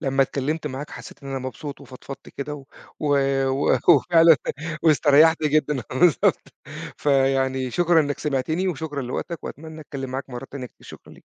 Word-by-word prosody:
لمّا 135 0 +2
اتكلّمت 150 +4 -2
معاك 140 +1 -6
حسّيت - - -11
إن 140 - -8
أنا 135 0 -3
مبسوط 130 +2 -7
وفضفضت 135 +1 -11
كده 150 +1 -6
و 140 -2 -10 0.8
و 135 +2 +2
وفعلًا 165 -2 +6 0.5
واستريّحت 155 +1 +5
جدًا 150 -3 +1
بالضبط، 150 +6 +2 0.4
فيعني 135 -2 +1
شكرًا 175 +4 +3
إنك 145 -2 -2
سمِعتني 155 +6 -1
وشكرًا 150 -4 -4
لوقتك 140 +6 -5
وأتمنّى 160 +1 -8
أتكلّم 135 -3 -7
معاك 135 +1 -5
مرّات 125 +1 -8
تانية 135 -2 -6
كتير، - - -20
شكرًا - - -13
ليك. - - -18
140 Hz, 155 wpm, -23 LUFS, 135-155 Hz, 0.8 s, وفعلًا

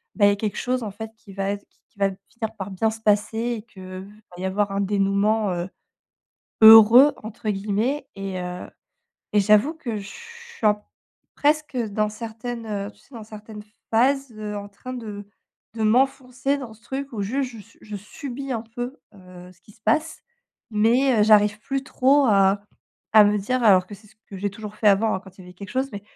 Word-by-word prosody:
ben 205 - +4
il - - +7
y - - +4
a - - +1
quelque 205 0 -3
chose 255 0 -1
en 215 -3 -5
fait 220 +2 -8
qui 225 -3 -16
va 195 0 -2
être 200 0 -6 0.2
qui - - -27
va 195 0 +3
finir 220 +3 -7
par 195 0 -6
bien 220 +4 +1
se 225 - -7
passer 210 +1 +1
et 235 -1 -2
qu'il 205 -4 -15 0.5
va 180 - -9
y - - -2
avoir 200 +1 0
un 195 - -1
dénouement, 200 +1 +1
heu, 175 +1 -4 0.9
«heureux», 225 +6 +9
entre 220 0 -8
guillemets 215 +8 -1
et 195 -1 -5
heu, 180 0 -6 0.7
et 210 - +5
j'avoue 210 +10 +4
que 235 -8 -5
je 200 -1 -7
suis 470 - -10
en 210 0 +3 0.5
presque, 300 -1 +1
heu, 235 -3 -1
dans 210 +1 0
certaines, 230 +2 -6
heu, 205 -2 -4
tu - - -28
sais, 280 - -23
dans 230 - -8
certaines 215 0 -10 0.3
phases, 270 +3 +2
heu, 210 -1 -5
en 200 0 -7
train 255 +6 -9
de 210 -5 -7 0.5
de 220 - -2
m'enfoncer 260 +3 +1
dans 250 -5 -8
ce 220 - -21
truc 275 +3 -5
où 210 - -3
juste 255 +6 -1
je - - -10
su 225 +3 -22
je 210 -1 -8
subis 265 +6 -7
un 230 -3 -2
peu, 245 +4 -6 0.2
heu, 180 -2 -14
ce 175 - -30
qui - - -19
se 220 - -27
passe 315 +6 0 0.5
mais 235 +3 +3
heu, - - +6
j'arrive 210 -1 +4
plus 270 +4 -3
trop 275 +1 +3
à 200 -2 +3 0.5
à 215 -1 +9
me 205 0 +2
dire 250 +6 -1
alors 190 -4 +6
que - - -10
c'est 210 +2 -20
ce 215 - -23
que 195 - -9
j'ai 200 +2 -2
toujours 210 0 -9
fait 215 - +1
avant, 205 +2 +4
hein, - - -4
quand 190 -2 -16
il - - -12
y - - -13
avait 180 - -13
quelque 195 +2 -10
chose 265 +1 -1
mais 205 -1 -7
215 Hz, 220 wpm, -23 LUFS, 200-245 Hz, 0.9 s, heureux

